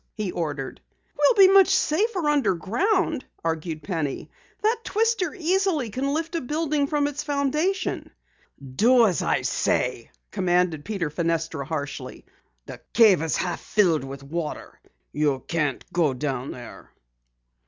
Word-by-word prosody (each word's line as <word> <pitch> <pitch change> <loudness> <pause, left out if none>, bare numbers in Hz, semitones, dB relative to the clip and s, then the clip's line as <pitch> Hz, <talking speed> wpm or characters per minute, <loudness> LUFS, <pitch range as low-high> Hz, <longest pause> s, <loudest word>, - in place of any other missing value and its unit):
he 210 -4 -3
ordered. 150 -6 -4 0.3
"We'll 405 -6 +6
be 385 - +4
much 390 -2 +7
safer 375 0 +1
underground," 285 - +1 0.2
argued 160 -1 -3
Penny. 155 -4 -3 0.3
"That 450 +2 +2
twister 435 -5 0
easily 350 - 0
can 270 +5 -1
lift 320 +3 -2
a 335 - -1
building 295 +1 -1
from 290 -1 +1
its 290 0 -3
foundation." 300 +6 -1 0.7
"Do 240 +3 +6
as 185 -6 +1
I - - 0
say!" - - -1 0.2
commanded 175 -4 +1
Peter 190 -8 -3
Fenestra 165 -2 -2
harshly. 145 -4 -5 0.4
"The - - -10
cave 215 -8 +6
is 160 -1 -1
half 175 -2 -2
filled 175 -9 +2
with 135 0 -8
water. 155 +2 -5 0.3
You 145 -3 0
can't 150 -5 -1
go 160 -6 +2
down 130 -1 -3
there." 120 -1 -10
210 Hz, 130 wpm, -24 LUFS, -, 0.7 s, much